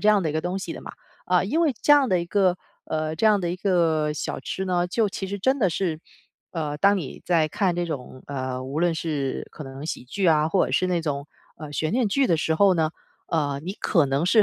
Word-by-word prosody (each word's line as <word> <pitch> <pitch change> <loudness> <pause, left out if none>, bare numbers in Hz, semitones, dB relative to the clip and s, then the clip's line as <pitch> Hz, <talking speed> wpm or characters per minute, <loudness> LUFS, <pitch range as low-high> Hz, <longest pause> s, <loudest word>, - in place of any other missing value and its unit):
这 210 - +3
样 210 -2 +5
的 160 - 0
一 - - -4
个 155 - 0
东 180 +3 -2
西 190 - -5
的 - - -8
嘛。 - - -9 0.3
啊， 180 0 +3
因 290 - 0
为 305 -7 +2
这 290 - +6
样 285 -3 +5
的 185 -3 +3
一 170 - -3
个 185 0 +2 0.3
呃， 155 0 -2
这 220 +7 +2
样 210 -2 +5
的 175 -2 -1
一 180 - -3
个 165 -6 +1
小 150 - -4
吃 190 - -4
呢， 180 -1 +1
就 210 +4 +1
其 195 - -4
实 200 +1 -4
真 265 +8 +2
的 195 -7 +3
是， 160 -2 -2 0.5
呃， 150 -3 -3
当 200 +4 +4
你 155 -9 -6
在 165 -3 +3
看 180 +2 0
这 175 - 0
种， 130 -5 -6
呃， 130 -2 -4
无 140 +4 -3
论 175 -1 +2
是 150 -5 -2
可 155 - -9
能 135 +1 -8
喜 160 - -4
剧 185 +9 -1
啊， 155 -2 +4
或 185 +3 +3
者 - - -4
是 185 - +2
那 175 -2 0
种， 140 -2 -3 0.3
呃， 155 -2 -8
悬 155 +3 -1
念 240 -2 +2
剧 270 +6 +2
的 165 -7 +2
时 160 0 +1
候 195 +4 +5
呢， 160 -3 +2 0.4
呃， 145 -4 -1
你 190 +4 -5
可 165 -10 +2
能 135 +4 0
是 215 +4 +5
170 Hz, 275 characters per minute, -24 LUFS, 155-195 Hz, 0.5 s, 这